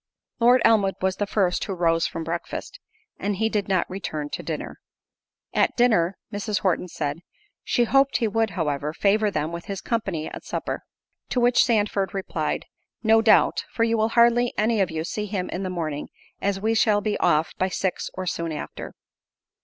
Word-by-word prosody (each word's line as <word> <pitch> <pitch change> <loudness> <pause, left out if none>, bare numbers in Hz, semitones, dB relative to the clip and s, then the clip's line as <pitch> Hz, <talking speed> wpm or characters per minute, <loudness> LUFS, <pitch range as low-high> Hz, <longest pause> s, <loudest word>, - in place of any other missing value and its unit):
Lord 245 +1 +5
Elmwood 200 -4 +4
was 190 0 0
the 205 - -1
first 190 -3 +1
who 195 - -3
rose 165 -1 +2
from 165 - -5
breakfast, 170 +1 -5 0.4
and 205 0 -1
he 220 +3 +1
did 210 -3 -1
not 190 -2 +1
return 155 -6 -4
to - - -4
dinner. - - -5 0.7
At - - +2
dinner, 200 -7 +3 0.2
Mrs. 205 -1 -2
Horton 180 -1 +1
said, 150 -2 -3 0.4
"She 240 - +2
hoped 270 +3 +3
he 230 - +1
would, 225 +1 +1
however, 150 -2 -1
favour 210 +4 +2
them 155 -4 -2
with 170 0 -6
his 195 -1 -4
company 195 -10 -2
at - - -8
supper." - - -4 0.5
To 250 - 0
which 245 0 +5
Sandford 205 -4 0
replied, 195 - -2 0.4
"No 225 0 +5
doubt, 220 -1 +4
for 230 - 0
you 230 0 +2
will 220 0 +2
hardly 235 +1 +4
any 220 0 +2
of 190 - +1
you 160 -1 -3
see 210 +5 -3
him 190 -3 -3
in 180 - -3
the 190 - -2
morning; 155 -5 -3 0.3
as 200 -1 0
we 220 +3 +1
shall 215 -2 +3
be 210 0 -1
off 160 -2 +2
by 185 - +1
six, 185 0 -2
or 185 - -4
soon 170 -2 -2
after." 150 - -7
195 Hz, 185 wpm, -24 LUFS, 170-220 Hz, 0.7 s, Lord